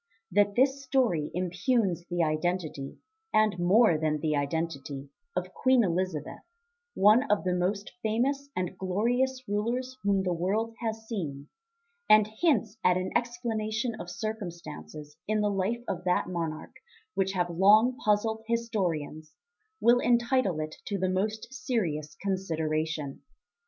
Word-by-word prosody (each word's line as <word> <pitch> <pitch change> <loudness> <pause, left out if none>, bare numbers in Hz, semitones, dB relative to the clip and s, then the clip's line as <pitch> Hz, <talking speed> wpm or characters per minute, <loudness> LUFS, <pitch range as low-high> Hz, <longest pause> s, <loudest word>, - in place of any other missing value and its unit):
That 205 +2 +3
this 270 +2 +2
story 245 - +1
impugns 180 0 0
the 175 -1 0
identity 155 -3 -2 0.3
and 215 -4 +3
more 180 -1 +5
than 155 -1 0
the 155 0 0
identity 140 -2 -3 0.3
of - - -3
Queen 260 -2 +4
Elizabeth, 180 -4 -2 0.6
one 215 +8 +5
of 210 - +2
the 180 -1 0
most 190 +3 -1
famous 270 +6 0
and 180 0 -2
glorious 245 +8 0
rulers 240 +5 -1
whom 200 -1 +2
the 180 -1 0
world 205 +7 -1
has 220 -1 -4
seen, 150 - -5 0.6
and 215 -1 +7
hints 220 -1 0
at 180 0 +4
an 185 0 -2
explanation 235 -1 -1
of 175 - -6
circumstances 170 - -6
in 215 0 +1
the 210 0 +1
life 200 +5 -1
of 180 -1 -3
that 180 - +2
monarch 165 -3 -4 0.4
which 195 0 0
have 175 -2 0
long 210 +8 +5
puzzled 220 +1 +1
historians, 175 -10 -2 0.4
will 240 +1 +5
entitle 235 - +2
it 155 0 -6
to 200 - -2
the 185 0 0
most 210 +6 -2
serious 175 - -2
consideration. 160 -6 -2
195 Hz, 135 wpm, -29 LUFS, 170-225 Hz, 0.6 s, and